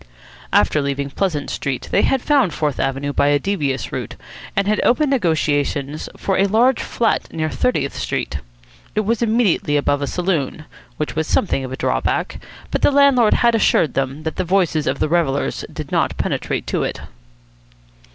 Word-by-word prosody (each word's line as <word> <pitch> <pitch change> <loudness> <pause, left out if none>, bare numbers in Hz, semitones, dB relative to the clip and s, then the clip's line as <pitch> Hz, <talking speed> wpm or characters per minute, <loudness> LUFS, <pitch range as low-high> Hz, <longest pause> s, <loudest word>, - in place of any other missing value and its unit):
After 150 - +3
leaving 140 0 -2
Pleasant 155 -4 -2
Street 135 -3 -3
they - - +3
had 265 -2 +1
found 270 - +2
Fourth 150 -3 -1
Avenue 135 +1 -1
by 140 - +2
a 145 0 +4
devious 145 -5 -2
route, - - -5 0.4
and 200 0 +1
had 210 0 +2
opened 280 +3 +3
negotiations 150 - 0
for 195 - -1
a 195 - +4
large 235 +5 +3
flat 230 -2 -1
near 155 -1 -2
Thirtieth 140 - 0
Street. 70 - -3 0.6
It 215 - +2
was 225 +3 -1
immediately 220 -10 +2
above 145 0 +1
a 140 - -1
saloon, 165 -4 -2 0.3
which 150 - -3
was 160 0 -1
something 135 -8 +1
of 130 - -6
a 130 - -5
drawback, - - -1 0.3
but - - -1
the - - +5
landlord 275 -5 +4
had 235 -1 +3
assured 165 - +3
them 135 +3 -2
that 160 - -4
the 185 - 0
voices 175 -4 +1
of - - 0
the - - 0
revellers 150 -4 0
did - - -7
not - - 0
penetrate - - -2
to - - -1
it. - - -3
160 Hz, 175 wpm, -20 LUFS, 145-215 Hz, 0.6 s, the